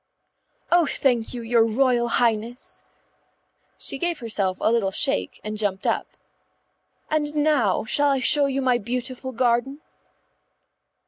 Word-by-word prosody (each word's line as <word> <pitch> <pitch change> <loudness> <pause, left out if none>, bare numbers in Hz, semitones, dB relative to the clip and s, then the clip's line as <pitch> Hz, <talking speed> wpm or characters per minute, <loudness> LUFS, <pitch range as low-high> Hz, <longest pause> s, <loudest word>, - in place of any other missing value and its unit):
"Oh, 345 -3 +4
thank 245 -5 0
you, 240 -2 -6
your 230 0 +3
Royal 240 +1 +1
Highness." 235 +1 -1 0.9
She 275 - -2
gave 345 0 -1
herself 200 -6 -1
a 220 - +1
little 230 -4 +1
shake 95 - 0
and 215 0 -5
jumped 200 -2 -2
up. - - 0 1.0
"And 300 -1 -1
now 290 -11 +1
shall 290 +6 +2
I 275 -1 +1
show 285 +2 +3
you 275 0 -2
my 250 -2 +2
beautiful 250 +3 -5
garden?" 245 +3 0
245 Hz, 130 wpm, -23 LUFS, 225-275 Hz, 1.0 s, Oh